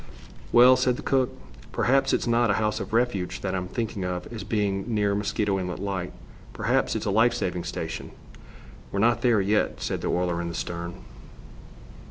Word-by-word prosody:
"Well," 125 +2 +7
said 125 -1 +2
the - - -8
cook, 130 -2 +2 0.4
"perhaps 135 +3 +2
it's - - +1
not 120 -1 +2
a 100 - +3
house 105 -1 0
of - - -6
refuge 115 -6 0
that 95 -2 -2
I'm 90 -1 -2
thinking 110 -2 -3
of 90 -1 -3
as 110 - -5
being 100 -3 -1
near 105 -2 +1
Mosquito 100 -1 0
Inlet 90 -1 -3
Light. 95 -2 -3 0.4
Perhaps - - +1
it's - - -2
a 100 - 0
life 115 +4 +4
saving 90 -1 -2
station." - - -5 0.8
"We're - - -3
not 115 +3 +3
there 120 -5 +4
yet," 105 +2 +1
said - - -3
the - - -2
oiler, 90 -1 0
in 85 - -3
the 85 - -6
stern. 85 +1 -5
100 Hz, 185 wpm, -26 LUFS, 90-115 Hz, 0.8 s, Well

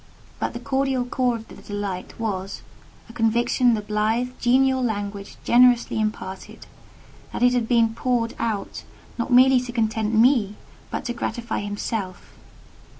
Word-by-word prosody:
But - - -2
the 240 - -5
cordial 265 0 0
core 250 -1 0
of 225 -1 -8
the - - -13
delight 205 -2 -6
was, 195 -4 -4 0.4
a 230 - -13
conviction 235 +1 +2
the 215 - -3
blithe, 215 +4 0
genial 260 +2 +3
language 205 -3 -4
generously 245 -1 +4
imparted, 215 -3 -5 0.7
that - - -3
it 245 0 +5
had 240 -2 0
been 230 -2 +3
poured 235 -1 -1
out 220 -4 -3 0.4
not 235 - -2
merely 255 +1 +6
to 245 -1 -6
content 220 -1 0
me—but 220 -3 0
to 240 - -2
gratify 235 0 -3
himself. 205 -2 -5
230 Hz, 140 wpm, -23 LUFS, 210-245 Hz, 0.7 s, merely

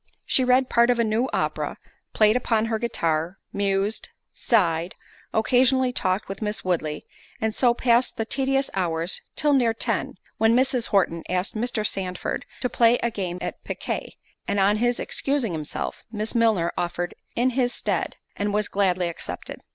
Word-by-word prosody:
She 260 - +2
read 255 +1 +4
part 235 0 +4
of 245 - +3
a 235 - +3
new 225 +4 +1
opera, - - -1 0.3
played 215 0 +4
upon 225 -3 +1
her 225 -1 -1
guitar, 170 -6 -1 0.2
mused, 200 +1 0 0.2
sighed, 175 -6 +1 0.4
occasionally 255 +3 +3
talked 185 -3 0
with 195 +2 -6
Miss 210 -2 -2
Woodley, 155 -4 -1 0.3
and 220 0 0
so 240 0 +3
passed 240 0 +2
the 225 - -1
tedious 270 +3 0
hours 170 -2 0
till 295 -1 +2
near 240 -4 +3
ten, - - -1 0.2
when 225 +1 +4
Mrs. 255 -1 +2
Horton 170 -4 +1
asked 180 +4 -1
Mr. 220 -1 -1
Sandford 185 -3 -2
to - - +1
play 235 0 +4
a 235 - +1
game 185 -5 -3
at - - -5
piquet, - - -4 0.3
and 200 - 0
on 200 +2 +4
his 240 +2 +1
excusing 275 -7 -1
himself, 155 -2 -4
Miss 215 0 -3
Milner 220 -8 +3
offered 175 0 -2 0.2
in 250 +2 +2
his 245 -1 +1
stead, - - -2 0.2
and 205 0 -1
was 210 -1 +1
gladly 185 -3 +1
accepted. 170 - -6
220 Hz, 165 wpm, -24 LUFS, 185-245 Hz, 0.4 s, read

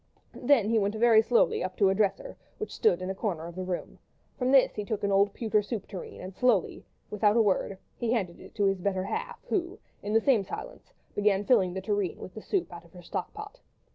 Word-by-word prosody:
Then 245 -5 +3
he 225 - +4
went 205 +1 0
very 225 0 +6
slowly 235 +1 +2
up 185 0 -5
to 200 -2 +4
a - - +3
dresser 215 - -1 0.2
which 430 - -5
stood 185 -4 +2
in 185 - -2
a - - -2
corner 190 -5 -3
of 170 - -8
the 185 +2 -5
room; 180 -1 -5 0.4
from 255 0 0
this 270 -2 +5
he 210 - -4
took 210 0 -4
an 200 - +1
old 200 +1 +4
pewter 215 -1 +1
soup 210 0 -5
tureen 190 -4 -8
and 185 +1 -8
slowly, 225 -2 +2
and - - -15 0.3
without 210 +1 +3
a - - +6
word, 195 -1 0 0.2
he 235 -1 -1
handed 190 -8 -1
it - - -14
to 205 - +1
his 195 -2 +1
better 190 -1 0
half, 195 - -4
who, 365 +1 -1 0.2
in 210 - -3
the 225 - +6
same 225 -3 +3
silence, - - -8 0.2
began 205 -1 +1
filling 190 -7 +3
the 190 - -3
tureen 205 -2 -1
with 185 - -9
the 220 - -8
soup 365 - -2
out 170 -1 -9
of 170 - -21
her 180 -1 -12
stock - - -4
pot. 425 +4 -9
205 Hz, 240 wpm, -28 LUFS, 190-235 Hz, 0.4 s, very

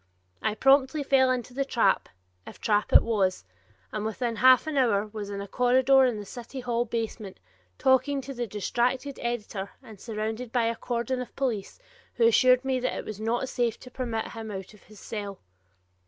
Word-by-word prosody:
I 215 -1 0
promptly 270 +4 +3
fell 265 -1 +4
into 250 -1 -2
the 275 +2 0
trap, 230 -7 +1 0.4
if - - -11
trap 210 -1 +1
it - - +8
was, 200 -5 0 0.5
and 215 - -3
within 230 +1 -2
half 255 +4 +6
an 310 -1 -3
hour 225 -7 +2
was 210 -1 -7
in 200 -1 -4
a 200 - -6
corridor 260 +4 +4
in 245 -4 0
the 205 - -7
city 245 +5 -8
hall 240 -1 0
basement, 225 -3 -4 0.4
talking 275 +1 +3
to 275 +1 -7
the 240 -2 -3
distracted 245 +7 -1
editor 210 -4 -3
and 220 -5 -13
surrounded 220 +2 -4
by 245 -1 +2
a 230 0 0
cordon 245 +2 -2
of 250 - -9
police, 240 -8 -2 0.4
who 230 - +3
assured 255 +3 +5
me 260 -1 +1
that 255 - -2
it - - -5
was 215 -1 -7
not 235 +4 -1
safe 240 -3 -1
to 250 - -12
permit 235 -4 -3
him 225 -1 -7
out 195 0 -7
of 210 - -18
his 215 -1 -16
cell. 205 -3 -6
235 Hz, 190 wpm, -27 LUFS, 215-255 Hz, 0.5 s, it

